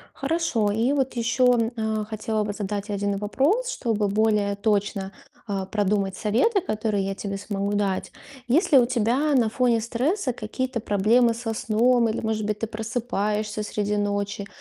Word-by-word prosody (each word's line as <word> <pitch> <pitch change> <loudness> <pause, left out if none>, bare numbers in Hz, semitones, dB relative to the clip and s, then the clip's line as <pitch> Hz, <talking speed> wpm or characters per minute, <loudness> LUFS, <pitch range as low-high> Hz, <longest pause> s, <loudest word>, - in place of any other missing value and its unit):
Хорошо. 275 -8 0
И 225 +6 +1
вот 270 -3 0
еще, 235 0 +2
а, 220 -1 -1
хотела 215 0 -2
бы 205 - -3
задать 205 0 -4
1 200 0 -1
вопрос, 280 - +1
чтобы 220 - -1
более 210 -1 +2
точно, 200 -2 -1 0.3
а, 195 -2 -3
продумать 195 -1 0
советы, 255 - +2
которые 215 - -1
я 195 0 -2
тебе 200 0 -4
смогу 200 0 -3
дать. 200 -2 -1 0.3
Есть 300 - +2
ли 275 - +9
у 240 - +4
тебя 250 +5 +1
на 240 -4 +3
фоне 240 0 +2
стресса 255 - -1
какие-то 245 +2 -3
проблемы 225 +4 +3
со 225 -1 -4
сном? 235 +2 +2
Или, 220 - -2
может 220 -1 -2
быть, 210 0 -2
ты 225 - -1
просыпаешься 215 -2 -2
среди 210 0 -2
ночи 205 0 -2
220 Hz, 160 wpm, -24 LUFS, 205-240 Hz, 0.3 s, ли